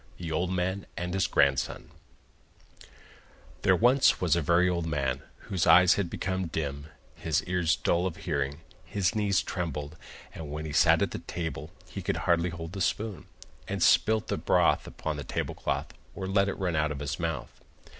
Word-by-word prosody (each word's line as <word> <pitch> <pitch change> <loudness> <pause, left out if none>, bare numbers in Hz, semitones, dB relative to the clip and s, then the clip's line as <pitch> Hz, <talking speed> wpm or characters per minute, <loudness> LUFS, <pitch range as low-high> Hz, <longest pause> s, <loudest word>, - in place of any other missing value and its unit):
THE 85 -2 -5
OLD 85 +3 0
MAN 95 +2 -2
AND 90 +1 -3
HIS 95 - +1
GRANDSON 70 -2 +1 1.7
There - - +4
was 125 +4 +4
once 85 -4 +2
a 85 - +1
very 85 +4 +3
old 85 -2 -1
man, 70 -4 -1 0.2
whose 95 -4 -1
eyes 90 +2 +7
had 100 -4 -1
become 95 0 -2
dim, 70 -3 -4 0.3
his 80 -3 -1
ears 90 -3 +1
dull 85 +2 +1
of 85 - -6
hearing, 70 -2 -2 0.2
his 100 -2 0
knees 105 -3 +1
trembled, 75 -4 -4 0.4
and 80 -3 -7
when 75 +2 -5
he 75 - -5
sat - - +5
at - - -4
table 80 -3 -4 0.2
he - - -6
could - - -1
hardly 85 +1 +2
hold 85 0 -7
the 95 - -4
spoon, 105 +2 -2 0.4
and - - -1
spilt 110 -1 +4
the - - -1
broth - - +2
upon 80 -2 -4
the 75 - -5
table - - -3
cloth - - -3 0.2
or 95 - -4
let 100 +1 +2
it - - -4
run 90 -4 -1
out 75 0 +1
of 75 - -4
his 70 +1 -4
mouth. 80 -7 -4
85 Hz, 180 wpm, -28 LUFS, 75-95 Hz, 1.7 s, eyes